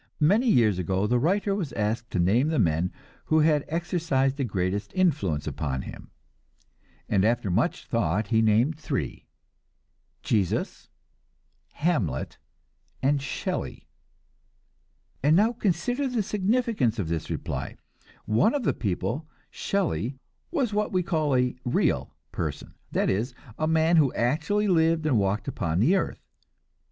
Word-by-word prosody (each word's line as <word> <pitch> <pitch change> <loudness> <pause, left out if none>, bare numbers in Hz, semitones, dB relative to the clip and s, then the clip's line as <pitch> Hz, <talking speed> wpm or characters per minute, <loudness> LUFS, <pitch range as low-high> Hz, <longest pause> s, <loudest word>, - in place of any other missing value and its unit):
Many 205 +11 +4
years 110 - +4
ago 95 +3 0
the 120 +3 +2
writer 195 - +1
was 185 -8 -3
asked 110 +2 -2
to - - -3
name 110 - +3
the 160 0 0
men 85 +2 +1 0.3
who 155 0 +3
had 150 -2 +3
exercised 160 -5 0
the 140 - 0
greatest 100 -2 -2
influence 100 - +1
upon 65 -4 -3
him, - - -10 1.0
and 95 -2 +2
after 110 -3 +1
much 115 - 0
thought 105 -2 0
he 110 -1 +3
named 115 +8 +2
three: - - -4 1.0
Jesus, 100 -6 -1 0.8
Hamlet 120 - -1 0.6
and 140 +1 +2
Shelley. 135 - -4 1.3
And 150 +4 +4
now 215 +6 +4
consider 240 - 0
the 245 -4 0
significance 205 - 0
of 100 -6 -2
this 80 -1 -3
reply. - - -4 0.5
One 115 - +3
of 285 - -1
these - - +2
people, 110 - -2 0.2
Shelley, 135 - -1 0.3
was 270 -10 -1
what 210 +1 0
we 185 -1 +1
call 155 -6 0
a 125 0 +1
"real" 125 - 0 0.2
person; - - -4 0.2
that - - +1
is, 115 +6 -2 0.2
a 155 - +1
man 160 +1 +3
who 145 -5 +4
actually 170 - +1
lived 165 -3 +3
and 130 -8 +3
walked 100 +4 0
upon 85 -10 -1
the 150 - +4
earth. 195 - -2
135 Hz, 140 wpm, -26 LUFS, 105-175 Hz, 1.3 s, Many